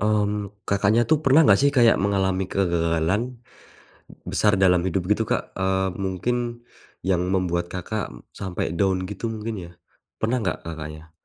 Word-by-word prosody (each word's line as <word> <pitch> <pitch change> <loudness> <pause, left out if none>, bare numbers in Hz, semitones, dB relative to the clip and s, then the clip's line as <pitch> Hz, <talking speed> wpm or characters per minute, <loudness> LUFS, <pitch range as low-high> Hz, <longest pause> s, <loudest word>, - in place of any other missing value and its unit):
Mmm, 105 -1 -1
Kakaknya, 100 +3 +3
tuh 155 - +5
pernah 140 +3 +6
nggak 100 -7 +5
sih 140 - +5
kayak 120 -2 +6
mengalami 95 -1 +1
kegagalan, 85 +1 +1 1.1
besar 105 - +3
dalam 95 -2 +4
hidup 95 0 0
gitu, 105 +2 +3
Kak? - - 0 0.2
Eee, 95 0 +1
mungkin 120 +6 -2 0.4
yang 90 -1 +1
membuat, 85 -2 0
Kakak, 100 +4 -4 0.2
sampai 95 -5 -4
down 95 -2 +2
gitu 105 +3 -4
mungkin 110 +1 -4 0.2
ya. - - -17 0.5
Pernah 115 +3 +1
nggak, 95 - -1
Kakaknya? 80 -1 -7
95 Hz, 145 wpm, -24 LUFS, 90-110 Hz, 1.1 s, pernah